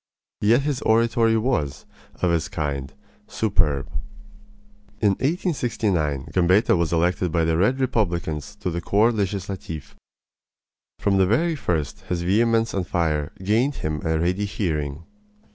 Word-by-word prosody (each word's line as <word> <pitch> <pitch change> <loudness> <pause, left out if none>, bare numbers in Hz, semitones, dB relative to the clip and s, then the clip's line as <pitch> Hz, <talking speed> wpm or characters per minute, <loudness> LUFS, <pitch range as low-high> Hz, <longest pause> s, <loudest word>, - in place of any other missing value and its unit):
Yet 115 +6 +4
his 145 -3 -1
oratory 115 0 +3
was, 100 - -1 0.4
of 90 - +3
its 85 +1 0
kind, 70 -7 -3 0.4
superb. 75 - 0 1.1
In 105 - +4
1869 105 - -1
Gambetta 90 +6 +4
was 85 -2 0
elected 85 +1 +1
by 80 0 +2
the 80 0 +1
Red 105 +10 +2
Republicans 85 - -1
to 90 - -1
the 85 +1 -3
Corps 105 +6 +3
Legislatif. 95 -6 -4 1.0
From 100 -1 +1
the 95 -1 +4
very 160 - +2
first 80 - -2
his 85 -1 -1
vehemence 115 +4 +2
and 95 -4 -2
fire 75 -4 0
gained 115 +8 +2
him 75 -1 -2
a 80 -1 +1
ready 90 +5 0
hearing. 80 -7 -2
90 Hz, 130 wpm, -23 LUFS, 80-110 Hz, 1.1 s, Yet